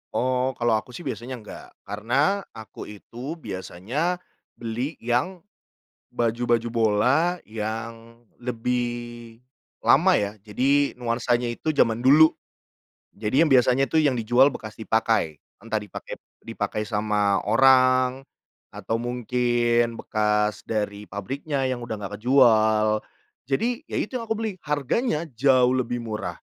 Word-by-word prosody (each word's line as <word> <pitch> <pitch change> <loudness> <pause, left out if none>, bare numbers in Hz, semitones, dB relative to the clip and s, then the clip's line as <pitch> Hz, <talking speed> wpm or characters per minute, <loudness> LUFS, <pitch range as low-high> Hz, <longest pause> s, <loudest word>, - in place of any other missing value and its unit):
Oh 130 +1 0
kalau 120 -2 +2
aku 125 - -13
sih 175 - -8
biasanya 125 0 -5
enggak, 110 -4 -11 0.2
karena 130 - 0 0.2
aku 110 -2 -9
itu 120 +8 -8
biasanya 115 - -3 0.4
beli 120 +6 -4
yang 130 +10 -1 0.7
baju-baju 120 0 0
bola 120 +10 +2
yang 115 +2 -6 0.2
lebih 120 -1 -4 0.4
lama - - +5
ya, 100 -1 +1
jadi 140 +7 +2
nuansanya 120 0 0
itu 155 - -1
jaman 115 -4 +1
dulu. 155 +4 +6 0.8
Jadi 110 +8 +1
yang 165 - +5
biasanya 130 0 +4
tu 160 - -1
yang 150 -4 +4
dijual 125 +5 +4
bekas 110 -4 -8
dipakai. 110 -8 0 0.2
Entah 110 -1 -1
dipakai 105 -3 -9 0.2
dipakai 105 0 -3
sama 105 -2 +1
orang 130 +1 +4 0.5
atau 115 +1 -3
mungkin 120 -1 0
bekas 105 -2 0
dari 105 -1 -3
pabriknya 135 +7 -3
yang 130 -2 -1
udah 120 -2 -5
enggak 105 0 -7
kejual. 110 -4 +4 0.5
Jadi 230 - 0
ya - - -4
itu 250 +2 -2
yang 230 - -8
aku 225 - 0
beli. 220 -1 -2
Harganya 150 - -1
jauh 130 0 +4
lebih 120 -2 -2
murah. 110 -1 -4
120 Hz, 125 wpm, -24 LUFS, 110-135 Hz, 0.8 s, dulu